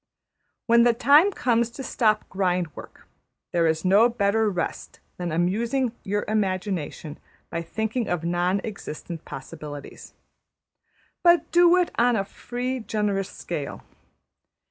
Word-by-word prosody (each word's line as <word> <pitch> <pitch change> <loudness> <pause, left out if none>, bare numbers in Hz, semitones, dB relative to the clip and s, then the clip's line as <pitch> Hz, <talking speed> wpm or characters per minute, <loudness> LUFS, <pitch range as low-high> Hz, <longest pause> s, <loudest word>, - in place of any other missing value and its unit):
When 235 0 +5
the 235 0 +4
time 285 - +5
comes 235 - +1
to 270 +3 -8
stop 215 -4 +1
grind 180 -4 -1
work, - - -12 0.5
there 170 -1 +2
is 160 +2 0
no 205 +6 +5
better 220 -1 +1
rest 180 -4 -4 0.2
than 175 -2 -3
amusing 230 +10 0
your 205 +1 -1
imagination 185 -7 -2 0.3
by 170 - -2
thinking 220 +6 -2
of 175 -2 -2
non 175 +3 0
existent 170 -5 -7
possibilities; 145 +1 -9 1.1
but 345 -1 +4
do 345 +1 +6
it 360 -1 +1
on 240 0 +4
a 195 -2 0
free, 250 +5 -4
generous 210 -4 -1
scale. - - -6
205 Hz, 125 wpm, -25 LUFS, 175-235 Hz, 1.1 s, do